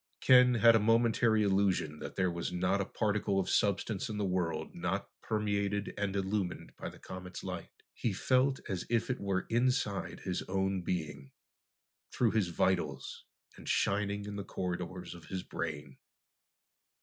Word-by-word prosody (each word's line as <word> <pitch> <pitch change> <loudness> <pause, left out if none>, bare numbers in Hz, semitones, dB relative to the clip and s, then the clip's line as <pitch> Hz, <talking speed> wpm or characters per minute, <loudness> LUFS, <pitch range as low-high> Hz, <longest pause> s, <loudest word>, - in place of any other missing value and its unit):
Ken 125 -1 +6
had 115 0 +7
a - - +5
momentary 115 0 +3
illusion 95 -6 +1
that - - -7
there 95 -2 +1
was 85 +1 -3
not 90 +2 +1
a - - -1
particle 105 -2 0
of 95 - -1
substance 100 +1 +1
in 105 - -4
the 105 - 0
world 85 -4 -1
not 90 +3 -2
permeated 105 -2 -1
and 100 -1 -2
illumined 95 -2 -2
by - - -6
the - - -13
comet's 90 -1 -8
light. - - -5 0.2
He 115 - -1
felt 130 +7 +2
as 95 -2 -2
if 120 +2 +1
it 130 - -3
were 100 -1 -1
inside 120 -4 0
his 90 -1 -2
own 95 0 0
being, 80 -6 -3 0.8
through 120 -3 +2
his 105 -5 +2
vitals, 80 -6 -1 0.3
and - - -8
shining 100 0 +1
in 105 0 -5
the 100 - -3
corridors 90 -1 -4
of 85 -1 -12
his 95 -1 -4
brain. 75 -4 -5
100 Hz, 160 wpm, -32 LUFS, 90-105 Hz, 0.8 s, had